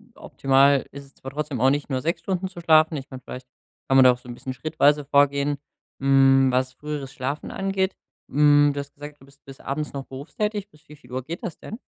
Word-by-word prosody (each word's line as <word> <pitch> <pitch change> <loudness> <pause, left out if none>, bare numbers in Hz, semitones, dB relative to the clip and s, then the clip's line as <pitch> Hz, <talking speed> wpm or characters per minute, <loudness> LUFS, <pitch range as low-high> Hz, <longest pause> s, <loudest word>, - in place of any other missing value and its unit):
optimal 135 0 +2
ist 140 0 -10
es 135 - -22
zwar 135 - -9
trotzdem 145 -4 -4
auch 130 - +5
nicht, 145 +2 -1
nur 130 -1 -1
6 165 +4 -2
Stunden 190 -1 -2
zu 180 -2 -10
schlafen. 160 -1 +4
Ich 135 0 -8
kann 130 - -8
vielleicht 130 0 -9 0.4
kann 135 - +4
man 130 - +8
da 125 - +8
auch 125 - -9
so 125 - -15
'n 120 - -5
bisschen 130 +2 -7
schrittweise 150 0 +1
vorgehen, 140 0 +2 0.4
hm, 135 -1 +5
was 130 +1 0
früheres 145 -1 -6
Schlafen 140 +3 -4
angeht. 195 0 -1 0.4
Hm, 145 +1 +5
du 140 - -4
hast 140 0 -8
gesagt, 145 0 -11
du - - -16
bist 140 0 -23
bis 135 0 -12
abends 150 +2 -4
noch 135 -1 -6
berufstätig. 205 +9 -4
Bis 150 -3 -25
wie 150 - -13
viel 125 -4 -20
Uhr 130 0 -4
geht 170 +5 -7
das 170 - -5
denn? 220 +5 -9
140 Hz, 230 wpm, -24 LUFS, 135-150 Hz, 0.4 s, man